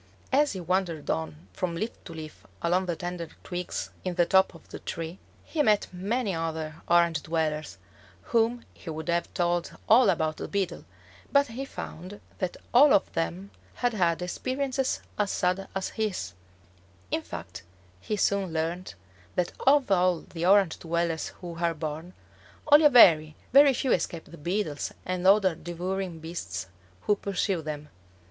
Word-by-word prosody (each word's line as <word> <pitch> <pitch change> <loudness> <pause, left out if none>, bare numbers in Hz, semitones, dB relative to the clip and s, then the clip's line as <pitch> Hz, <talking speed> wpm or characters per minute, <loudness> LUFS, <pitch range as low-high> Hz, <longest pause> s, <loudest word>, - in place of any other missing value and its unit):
As 290 +2 +4
he 190 - -5
wandered 175 -3 -1
on 80 +1 -4
from 170 - -2
leaf 220 +7 -2
to 165 - -8
leaf 155 -1 -9 0.2
along 180 +2 +2
the 175 - -1
tender 175 0 -5 0.2
twigs 180 -1 -4
in 185 -1 -2
the 175 -1 +4
top 190 0 +4
of 165 - -15
the - - -7
tree, 165 +2 -5 0.2
he 315 - -1
met 210 -7 +3
many 205 +4 -1
other 160 -2 -3
Orange 170 -3 +4
dwellers, 155 - -2 0.5
whom 235 +1 +1
he 170 - -10
would 160 +1 -5
have 170 0 0
told 175 -1 0
all 240 +3 +7
about 155 -1 0
the - - -5
Beetle, 190 -4 -2 0.5
but 280 -2 +4
he 255 +4 -5
found 185 -5 -8 0.2
that 185 -2 -2 0.2
all 275 +4 +8
of - - +1
them 85 +4 -3 0.2
had 245 -1 0
had 175 -4 +1
experiences 260 +7 -1 0.2
as 205 -1 +2
sad 185 +1 0
as 195 - -1
his; 190 - -3 0.8
in - - 0
fact 85 - -8 0.4
he 210 - -3
soon 200 -2 +1
learned 165 - -3 0.4
that 180 - 0 0.2
of 275 -5 +5
all 180 -2 +3
the 170 0 -4
Orange 195 -3 +4
dwellers 170 -1 -1
who 170 -2 -7
are 170 -1 +2
born, 155 +3 -5 0.6
only 300 +1 +8
a - - +9
very, 155 - +7 0.2
very 280 +1 +8
few 260 0 0
escape 165 -1 0
the 170 - -13
Beetles 170 -2 -2
and 185 0 -1
other 195 -2 +5
devouring 175 +2 -4
beasts 160 - -5 0.4
who 210 - +2
pursue 195 -2 -1
them. 150 -1 -6
175 Hz, 160 wpm, -27 LUFS, 160-200 Hz, 0.8 s, a